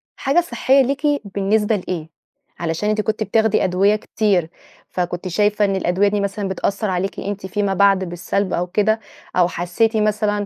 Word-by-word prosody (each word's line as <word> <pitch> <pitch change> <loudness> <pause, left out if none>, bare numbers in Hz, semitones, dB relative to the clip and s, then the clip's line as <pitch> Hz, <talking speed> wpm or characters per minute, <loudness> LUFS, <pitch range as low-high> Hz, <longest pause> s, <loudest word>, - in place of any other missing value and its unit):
حاجة 275 +5 +2
صحيَّة 270 -2 +2
ليكِ، 275 +3 -2 0.3
بالنسبة 210 +2 +2
لإيه؟ 175 -5 -4 0.5
علشان 170 +5 -1
أنتِ 215 0 +1
كنتِ 215 +1 -1
بتاخدي 220 +1 +2
أدوية 190 +3 +3
كتير، 200 -5 0 0.4
فكنتِ 175 0 -3
شايفة 210 +3 +2
إن 195 -1 0
الأدوية 190 +1 +1
دي 205 0 0
مثلًا 200 0 -2
بتأثَّر 200 +2 -2
عليكِ 185 +1 -2
أنتِ 200 0 -5
فيما 195 +1 -1
بعد 195 0 +4
بالسَّلب 180 +2 -2
أو 175 +1 -1
كده، 215 +4 +1 0.4
أو 180 -1 +4
حسِّيتِ 180 +6 0
مثلًا 210 -1 0
200 Hz, 160 wpm, -20 LUFS, 185-215 Hz, 0.5 s, بعد